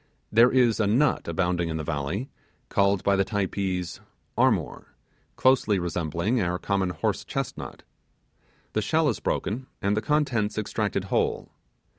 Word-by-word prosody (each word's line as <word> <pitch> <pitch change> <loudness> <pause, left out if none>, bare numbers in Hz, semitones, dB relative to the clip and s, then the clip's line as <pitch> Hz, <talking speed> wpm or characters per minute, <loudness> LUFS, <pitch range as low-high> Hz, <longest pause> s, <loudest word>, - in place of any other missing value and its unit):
There 115 +3 +6
is 125 -4 +3
a 105 - +2
nut 125 +9 +2
abounding 85 0 0
in 80 - -2
the 80 - -3
valley, 80 - -3 0.4
called 100 -1 +2
by 100 - +3
the 100 - +3
Typees 95 -3 -2 0.4
'armor', - - 0 0.4
closely 130 -6 +3
resembling 85 - -1
our 90 -1 0
common 95 -1 0
horse 80 -4 -2
chestnut. - - -5 0.9
The 110 - +1
shell 155 +7 +2
is 115 - -2
broken, 125 +6 -2
and 100 0 +1
the 110 - 0
contents 120 -6 0
extracted 105 -2 -1
whole. 95 - -1
100 Hz, 140 wpm, -26 LUFS, 90-115 Hz, 0.9 s, There